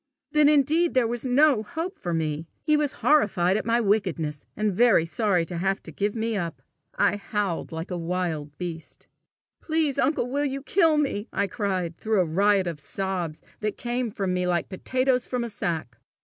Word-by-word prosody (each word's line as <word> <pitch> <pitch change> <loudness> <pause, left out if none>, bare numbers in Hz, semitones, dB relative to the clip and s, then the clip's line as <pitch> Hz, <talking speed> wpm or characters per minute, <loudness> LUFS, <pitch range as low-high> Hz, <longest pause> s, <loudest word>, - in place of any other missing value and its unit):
Then 300 -1 +5
indeed 305 +3 +3
there 255 -2 +4
was 240 +2 -2
no 270 -1 +4
hope 330 - -5
for 175 - -3
me! 160 -1 -2 0.2
He 305 -1 +3
was 295 -2 +1
horrified 195 -11 +4
at 215 - -2
my 230 +1 +3
wickedness, 180 -9 0
and 210 -1 +1
very 220 -5 +4
sorry 180 -1 +1
to 170 0 -5
have 195 +2 0
to - - -9
give 205 +2 -1
me 225 0 -1
up! 165 -8 -4 0.3
I 205 - +2
howled 200 -3 -2
like 165 +3 -5
a 180 - -2
wild 165 -4 -3
beast. 170 -3 -7 0.5
"Please, 315 -4 0
uncle, 270 -3 +1
will 285 +3 -1
you 275 -1 -3
kill 325 -1 +3
me!" 265 -8 -1
I 200 - 0
cried, 185 -4 -2
through 215 -3 +2
a - - +1
riot 195 +4 +3
of 170 -4 -4
sobs 175 0 -3 0.2
that 210 -1 -2
came 240 0 -2
from 195 -4 -2
me 180 0 0
like 175 -2 0
potatoes 255 +6 0
from 250 -1 -1
a 235 - -4
sack. 160 - -4
205 Hz, 190 wpm, -25 LUFS, 175-255 Hz, 0.5 s, Then